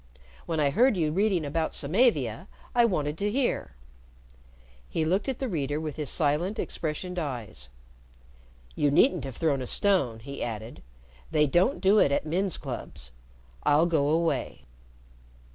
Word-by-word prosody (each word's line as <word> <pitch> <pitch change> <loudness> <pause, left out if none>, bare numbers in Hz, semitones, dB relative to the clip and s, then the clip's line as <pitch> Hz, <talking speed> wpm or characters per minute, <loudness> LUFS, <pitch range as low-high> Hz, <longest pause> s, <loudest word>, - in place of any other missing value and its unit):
When 165 -2 -1
I 145 -2 +2
heard 240 - +3
you 155 -3 +1
reading 190 -2 +1
about 160 +2 -2
Samavia, 160 - +1 0.3
I 240 -1 +5
wanted 150 -7 -1
to 205 - 0
hear." 250 - -1 1.1
He 160 - -1
looked 190 - 0
at 260 - -2
the 265 - -3
reader 150 - -2
with 155 -2 -5
his 150 -3 -3
silent 165 +6 0
expressioned 175 +3 -3
eyes. 120 - -6 1.0
"You 145 - +1
needn't 145 - +3
have 135 -3 -7
thrown 145 -5 +1
a 125 - -5
stone," 180 - +2
he 140 +4 -8
added. 110 0 -6 0.5
"They 150 -1 +3
don't 175 - +2
do 200 +2 +5
it 140 - +4
at 140 - 0
men's 180 +4 -1
clubs. 120 - -7 0.5
I'll 150 +3 +4
go 160 -5 +1
away." 160 - -1
155 Hz, 150 wpm, -27 LUFS, 140-190 Hz, 1.1 s, I